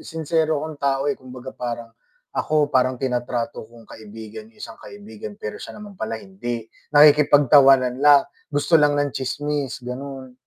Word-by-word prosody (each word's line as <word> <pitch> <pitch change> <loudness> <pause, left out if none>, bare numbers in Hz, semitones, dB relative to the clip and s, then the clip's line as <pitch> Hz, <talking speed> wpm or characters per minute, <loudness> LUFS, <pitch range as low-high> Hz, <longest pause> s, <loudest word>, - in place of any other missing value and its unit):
sinsero 160 -1 -1
akong 155 -1 -6
tao 135 -1 +1
eh, - - +2
kumbaga 130 0 -11
parang 120 -1 -5 0.4
ako 150 -1 +1
parang 130 0 +2
tinatrato 120 -3 -3
kong 115 0 -16
kaibigan 110 0 -11
yung - - -29
isang 115 - -9
kaibigan 105 0 -10
pero 105 - -6
siya - - -9
naman 210 -1 -10
pala 110 +1 -3
hindi. 115 +4 -6 0.3
Nakikipagtawanan 140 -3 +6
lang, 145 -1 +6 0.3
gusto 145 +3 +3
lang 145 -1 +3
ng 145 -1 0
tsismis, 140 -1 -3
gano'n. 130 +1 -7
130 Hz, 150 wpm, -22 LUFS, 115-145 Hz, 0.4 s, Nakikipagtawanan